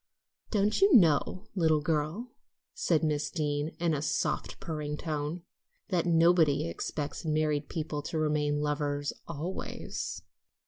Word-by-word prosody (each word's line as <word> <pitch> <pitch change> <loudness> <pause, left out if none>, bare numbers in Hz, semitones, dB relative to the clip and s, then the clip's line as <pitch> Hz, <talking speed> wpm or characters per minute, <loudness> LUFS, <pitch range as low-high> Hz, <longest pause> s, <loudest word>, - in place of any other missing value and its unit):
"Don't 210 - +1
you 390 -5 +7
know, 180 - +4
little 160 -5 +3
girl," 160 +10 -1 0.4
said 170 - +1
Miss 150 -1 0
Deane 150 -1 -2
in 170 -1 +1
a 145 - -1
soft, 150 - -1
purring 150 -2 -4
tone, 155 +2 -3 0.5
"that 175 -1 +1
nobody 165 - +4
expects 145 - -4
married 155 -2 0
people 155 -2 -3
to 155 +2 -4
remain 150 -1 +1
lovers 145 -1 -1
always?" 170 +3 -5
155 Hz, 125 wpm, -30 LUFS, 150-170 Hz, 0.5 s, you